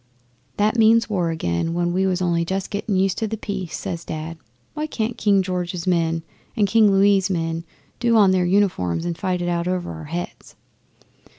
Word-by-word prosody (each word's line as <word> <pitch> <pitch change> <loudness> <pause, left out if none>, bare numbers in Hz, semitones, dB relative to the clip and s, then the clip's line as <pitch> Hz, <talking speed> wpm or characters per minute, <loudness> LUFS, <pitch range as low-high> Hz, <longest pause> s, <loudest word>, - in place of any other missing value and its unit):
'"That 215 +3 +2
means 225 0 +4
war 180 -4 0
again, 160 - -1
when 175 0 0
we 190 +1 +1
was 185 -1 0
only 170 -1 +1
just 190 +3 -3
getting 205 0 -2
used 190 0 +1
to 220 - -1
the 220 +1 -4
peace," 195 -5 -5
says 170 -1 -5
Dad. 160 +1 -6 0.3
"Why 305 +1 -3
can't 225 -5 -2
King 200 -4 +3
George's 180 -1 -3
men 165 -2 +1 0.3
and 205 -2 +3
King 215 0 +5
Louis' 195 0 +4
men 165 -2 -2 0.3
do 235 -1 +2
on 200 -3 +6
their 185 -1 +2
uniforms 175 - +1
and 170 -1 -2
fight 180 +1 -2
it - - -2
out 170 0 -1
over 180 - -2
our 80 -1 -8
heads?" 85 +3 -6
185 Hz, 190 wpm, -22 LUFS, 170-200 Hz, 0.3 s, on